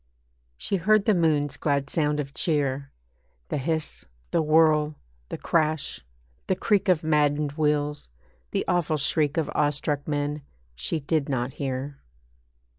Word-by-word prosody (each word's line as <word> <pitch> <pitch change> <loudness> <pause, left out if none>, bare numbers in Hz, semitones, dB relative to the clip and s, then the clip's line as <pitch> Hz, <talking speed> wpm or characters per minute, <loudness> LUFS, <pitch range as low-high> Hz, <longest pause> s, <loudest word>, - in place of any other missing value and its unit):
She 195 - 0
heard 210 +3 +3
the 215 - +4
moon's 150 -6 +1
glad 140 -2 0
sound 150 0 0
of 140 -1 -4
cheer; 140 -4 0 0.6
(The - - -1
hiss, 160 +2 -2 0.3
the - - +2
whirl, 155 -1 +4 0.3
the - - -4
crash, 155 -2 0 0.5
the 190 - +2
creak, 205 0 +1
Of 170 -4 +3
maddened 150 -1 +2
wheels, 150 - 0 0.4
the - - -1
awful 160 -3 +1
shriek 150 +1 +1
Of 160 - 0
awestruck 145 0 0
men 145 0 -1 0.3
she 60 - -2
did 145 0 0
not 130 -1 -1
hear.) 135 +1 -4
150 Hz, 135 wpm, -26 LUFS, 145-160 Hz, 0.6 s, the